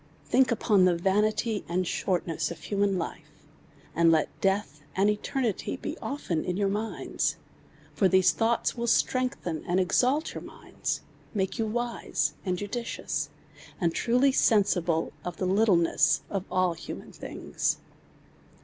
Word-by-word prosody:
Think 260 -1 +3
upon 210 -4 +4
the 180 -1 +4
vanity 210 +4 +1
and 180 +2 0
shortness 175 -2 -1
of 170 - -6
human 200 -1 0
life, 165 - -5 0.6
and 165 0 +4
let 160 -1 +3
deatli 190 -7 0
and 200 +2 +4
eternity 230 +1 -2
be - - -5
often 185 - -2
in 180 0 -2
your 200 -1 +1
minds: 215 +3 -1 0.6
for 195 - +3
these 185 0 +4
thonghts 230 +1 +1
will 235 -1 -2
strengthen 235 - 0
and 180 +1 +1
exalt 255 - +2
your - - -6
minds, - - -5 0.3
make 190 +1 -1
you 225 - +1
wise 240 +2 -1
and 185 -2 -1
judicious, 230 +5 -3 0.5
and 170 -4 +1
truly 250 +3 +3
sensible 180 -9 +2
of 175 -1 -5
the 185 - -1
littleness 180 -7 +3
of 195 -2 -2 0.3
human - - -8
things. - - -2
195 Hz, 135 wpm, -28 LUFS, 180-225 Hz, 0.6 s, upon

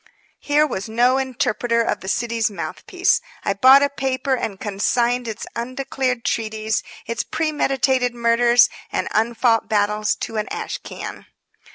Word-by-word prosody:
Here 295 +1 +2
was 220 -7 -4
no 245 +4 +3
interpreter 245 -3 0
of - - -1
the 190 - -10
city's 230 +1 0
mouthpiece. 205 - -1 0.2
I 200 - +2
bought 260 +7 +7
a - - +4
paper, 265 -1 -1
and 210 -6 -3
consigned 235 +4 0
its 220 0 -5
undeclared 255 0 -2
treaties, 220 -1 -1 0.2
its 230 - -2
premeditated 270 -5 0
murders 235 +1 +4 0.2
and - - -1
unfought 225 +1 +1
battles 210 0 +1
to 225 - -4
an 210 - -1
ash - - -4
can. - - -8
235 Hz, 140 wpm, -21 LUFS, 220-260 Hz, 0.2 s, bought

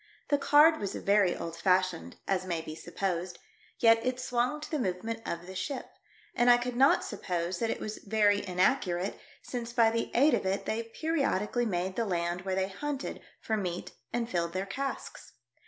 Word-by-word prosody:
The 285 - +3
card 300 +3 +6
was 200 -2 -3
very 200 -3 +3
old 165 0 -5
fashioned, 185 -1 +1
as 190 -2 +1
may 170 -3 -2
be 155 -1 -7
supposed, 180 +1 -3 0.4
yet 225 0 +5
it 255 0 -1
swung 250 +4 0
to 300 - -8
the 305 - 0
movement 225 +2 -2
of 170 +1 -4
the 190 - -8
ship, 265 +8 -3 0.5
and 240 +1 +3
I 240 - +8
could 245 0 -3
not 270 +3 +5
suppose 175 -3 -3
that 230 - 0
it - - -2
was 215 0 -5
very 205 -1 +2
inaccurate 185 0 +1 0.2
since 240 -1 -5
by 230 -2 +5
the 230 0 -1
aid 280 +5 +5
of - - +2
it 190 +1 -1
they 225 +1 -3
periodi 285 - 0
cally 240 -1 +1
made 185 -1 -2
the 230 - +1
land 175 -2 -1
where 190 -1 0
they 190 0 +1
hunted 280 +7 -4 0.2
for 220 - -1
meat 180 -4 -3 0.2
and 240 -1 -1
filled 170 -6 -1
their 190 +1 -2
casks. 270 +8 -5
205 Hz, 190 wpm, -30 LUFS, 180-245 Hz, 0.5 s, I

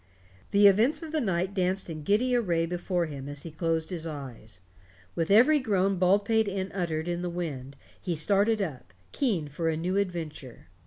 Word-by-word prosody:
The 200 +1 +4
events 220 - +4
of 320 - -7
the 315 -1 0
night 190 -3 -1
danced 185 0 0
in 160 -3 -6
giddy 225 +10 +2
array 175 -8 +1
before 175 +1 -1
him 140 -3 -7
as 145 0 -6
he 165 - -7
closed 165 +1 -1
his 165 -2 -4
eyes. 130 - -8 0.5
With 165 -1 -2
every 250 +9 +6
groan 195 -5 +1
Baldpate 205 +4 +3
Inn 195 -1 -3
uttered 170 -4 -2
in 175 0 -2
the 180 - -2
wind 145 -6 -5 0.3
he 175 - -2
started 200 +6 +2
up, 140 - -7 0.2
keen 200 - 0
for 165 +3 -2
a 160 - -1
new 180 +4 -1
adventure. 160 - -4
180 Hz, 180 wpm, -28 LUFS, 160-200 Hz, 0.5 s, every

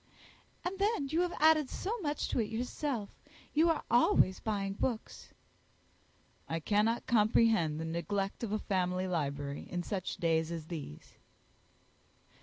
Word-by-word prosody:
"And 375 +2 -3
then 400 -9 +1
you 320 +4 +2
have 355 -1 -1
added 310 -3 +5
so 455 +5 -3
much 300 -6 -2
to - - 0
it 215 -2 0
yourself 240 0 -3 0.4
you 320 +3 +4
are 325 - +1
always 210 -5 +4
buying 200 -3 -2
books." 225 +2 -3 1.2
"I 165 - -1
cannot 210 +7 +1
comprehend 215 -8 +3
the 160 - -3
neglect 195 +4 -2
of 220 - -2
a 215 - +1
family 185 -2 -1
library 145 -4 -3
in 175 -1 -3
such 185 0 -3
days 165 -1 +1
as 165 -2 -5
these." 150 - -7
210 Hz, 140 wpm, -32 LUFS, 170-270 Hz, 1.2 s, added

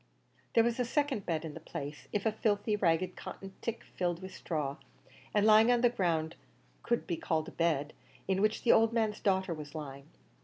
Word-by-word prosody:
There 230 - +7
was 235 +1 0
a - - +3
second 270 -4 -1
bed 165 -2 -1
in 155 - -6
the - - -8
place 145 +2 -7
if 205 0 -1
a 220 - +3
filthy, 210 0 +1
ragged 180 -2 +1
cotton 195 0 -8
tick 230 0 -3
filled 175 -2 -2
with 190 0 -8
straw, 145 -4 -3 0.5
and 210 0 +3
lying 220 +2 +7
on 240 -1 +3
the 245 -1 +4
ground, 165 -7 0 0.5
could 235 0 0
be 170 - -2
called 160 -1 -1
a - - -13
bed 155 -3 0 0.3
in 190 0 +1
which 215 +1 +1
the 240 - +5
old 225 +1 +5
man's 220 -2 0
daughter 190 -2 +1
was 150 -1 -8
lying. 140 -2 -7
190 Hz, 200 wpm, -32 LUFS, 160-220 Hz, 0.5 s, There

